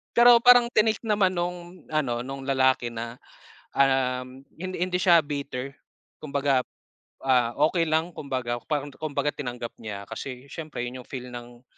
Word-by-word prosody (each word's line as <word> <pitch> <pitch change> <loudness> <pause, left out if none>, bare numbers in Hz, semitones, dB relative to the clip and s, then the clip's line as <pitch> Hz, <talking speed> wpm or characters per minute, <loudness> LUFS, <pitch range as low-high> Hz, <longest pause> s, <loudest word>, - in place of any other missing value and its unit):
pero, 240 0 +8
parang 245 -1 +8
tinake 215 +1 +2
naman 205 -4 +3
nung 175 0 -5
ano, 135 -6 0
nung 135 0 -6
lalaki 130 -2 +2
na, 115 +1 -5 0.6
um, 130 -1 +1 0.2
hindi 185 0 -5
hindi 180 0 0
siya 175 -2 +6
bitter 140 -2 -5 0.5
kumbaga, 140 -3 +1 0.6
ah, 125 -3 +3
okey 170 0 +1
lang 160 +2 +1
kumbaga, 130 -4 -3
parang 145 -2 -2
kumbaga 150 -2 -1
tinanggap 125 -4 -5
niya 105 -3 -6
kasi 130 0 -7
siyempre 155 -5 -5
'yon 125 +1 -6
'yong - - -18
feel 125 -2 -6
ng, 120 0 -10
140 Hz, 150 wpm, -26 LUFS, 125-170 Hz, 0.6 s, pero